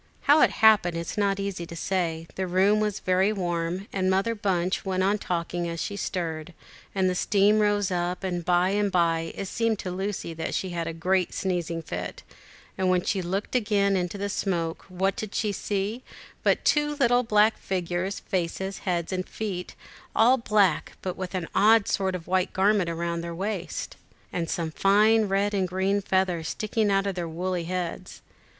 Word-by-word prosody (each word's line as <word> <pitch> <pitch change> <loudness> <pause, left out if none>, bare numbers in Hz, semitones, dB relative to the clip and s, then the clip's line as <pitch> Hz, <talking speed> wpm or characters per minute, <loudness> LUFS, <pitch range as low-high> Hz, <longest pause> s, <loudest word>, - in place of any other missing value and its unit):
How 295 +2 +5
it - - +6 0.2
happened, 195 -6 +5
it - - -2
is 170 - -5
not 200 -2 +1
easy 195 -4 -4
to 170 - -8
say; 165 -2 -1
the 190 0 -3
room 190 +4 +3
was 210 -1 -1
very 185 +2 +2
warm, 175 -1 -2
and 185 -1 +1
Mother 195 +5 +2
Bunch 185 -4 0
went 185 -1 0
on 205 +2 +2
talking 175 -1 -2
as 170 0 -4
she 200 - -3
stirred, 170 -4 -4 0.4
and 190 -1 +2
a 185 - +1
steam 205 +3 +3
rose 205 -2 +2
up, 180 +1 -2
and 175 -2 -2
by 175 +2 +3
and 205 0 +1
by 165 -2 +1
it - - -4
seemed 230 +2 0
to 185 - -5
Lucy 190 -2 -3
that 160 0 -4
she 185 - -2
had 170 -1 -3
a 165 - -3
great 180 +2 0
sneezing 170 -3 -2
fit, 90 - -6 0.6
and 185 -1 +2
when 180 -1 +2
she 195 - 0
looked 190 +3 -3
again 205 -5 +2
into 180 +1 -2
the 200 +1 -2
smoke, 170 -5 -2
what 190 +1 0
did 215 -2 -6
she 210 -1 0
see 205 +4 -2 0.4
but - - +1
two 295 0 +2
little 245 -3 +3
black 215 -2 +3
figures, 185 +1 -2
faces, 190 +2 -3
heads, 175 -1 -2
and 185 0 -3
feet 190 -5 -5 0.4
all 240 +4 +6
black, 210 -8 +2
but 185 -1 -3
with 185 0 -5
an 175 -3 -2
odd 215 +2 +5
sort 190 -1 0
of 170 -2 -6
white 185 +1 0
garment 195 -2 +2
round 170 0 -2
their 170 0 -5
waists, 190 -3 -4 0.4
and 165 -2 -2
some 165 -2 -2
fine 210 +5 +4
red 200 +1 0
and 190 -2 +1
green 190 +2 0
feathers 185 -4 0
sticking 215 0 0
out 195 0 +2
of 200 - -1
their 175 -2 -4
woolly 175 +1 -2
heads. 180 +1 -5
190 Hz, 190 wpm, -26 LUFS, 175-205 Hz, 0.6 s, it